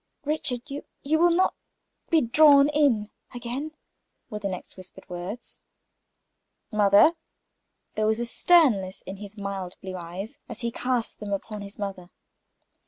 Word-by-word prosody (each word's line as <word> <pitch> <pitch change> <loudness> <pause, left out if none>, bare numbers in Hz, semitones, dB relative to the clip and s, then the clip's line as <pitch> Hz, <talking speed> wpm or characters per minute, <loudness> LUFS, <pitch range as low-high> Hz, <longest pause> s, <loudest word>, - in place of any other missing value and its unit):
"Richard, 285 -5 -1
you 285 +1 -5 0.2
you 315 +3 +2
will 345 +1 +6
not 355 +2 +3 0.6
be 325 -2 +4
drawn 280 +3 +6
in 275 -9 +2 0.2
again?" 250 +6 -4 0.6
were 210 - -4
the 200 -1 -2
next 185 -1 -7
whispered 185 -1 -12
words. 180 +6 -7 1.1
"Mother!" 210 +7 +6 0.8
There 215 0 0
was 220 +1 +1
a 240 - -1
sternness 235 - +3
in 195 - -7
his 205 +1 -10
mild 195 -3 -5
blue 190 -1 -7
eyes 180 +5 -7
as - - -7
he 235 -1 -1
cast 250 -1 -2
them 210 -1 -6
upon 205 +1 -4
his 200 0 -9
mother. 195 -3 -5
215 Hz, 145 wpm, -26 LUFS, 195-280 Hz, 1.1 s, will